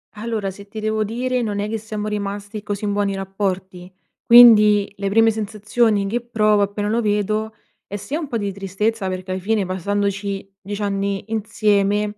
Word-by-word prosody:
Allora 215 -2 -3
se 200 +2 -13
ti 215 +2 -8
devo 215 0 0
dire, 250 +4 -2
non 210 -3 -2
è 205 +1 -2
che 225 - -2
siamo 215 -1 -5
rimasti 205 0 -4
così 205 0 -4
in 205 - 0
buoni 200 -1 0
rapporti. 190 -2 -4 0.3
Quindi, 215 -4 +7
le 200 0 -2
prime 225 +2 +4
sensazioni 215 0 0
che 235 +4 -1
provo 215 -3 +2
appena 205 +1 -2
lo 230 +2 +1
vedo, 215 +1 -1 0.3
è 205 - -7
sia 205 +10 -4
un 315 - -5
po' 245 -4 -2
di 200 -2 -2
tristezza 200 +2 -2
perché 185 0 -5
ai 185 - -3
fine, 205 +1 0
passandoci 200 +1 -2
10 205 +2 -6
anni 200 -1 -2
insieme, 210 -1 +1
205 Hz, 175 wpm, -21 LUFS, 200-220 Hz, 0.3 s, Quindi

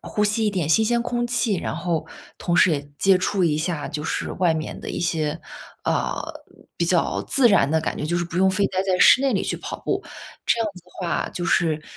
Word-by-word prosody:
呼 210 - -1
吸 210 +1 +1
一 - - +2
点 185 -6 -1
新 160 +8 +4
鲜 235 +1 +1
空 240 0 -1
气， 235 -4 +1
然 165 - -4
后 170 -1 -2 0.3
同 175 -1 -1
时 185 - +5
也 145 -2 -3
接 195 -1 +4
触 185 0 0
一 150 -3 +1
下， 155 -2 -2
就 150 0 -4
是 - - -3
外 175 -3 +1
面 155 0 -5
的 - - -7
一 - - -4
些， 160 -2 -1 0.4
啊， - - -1 0.6
比 - - +1
较 - - +1
自 265 -3 +5
然 195 -10 +4
的 160 - +3
感 - - -2
觉。 150 - -2
就 175 - 0
是 175 - -1
不 170 +1 -4
用 190 0 +4
非 195 +1 +1
待 185 0 -1
在 190 -1 0
室 255 - +7
内 270 -4 +1
里 190 - 0
去 - - -2
跑 - - -6
步。 - - -1 0.4
这 - - +2
样 225 - +1
子 180 - -13
的 180 - -22 0.2
话 - - -1
就 175 - -4
是。 160 -3 +1
180 Hz, 260 characters per minute, -23 LUFS, 160-205 Hz, 0.6 s, 室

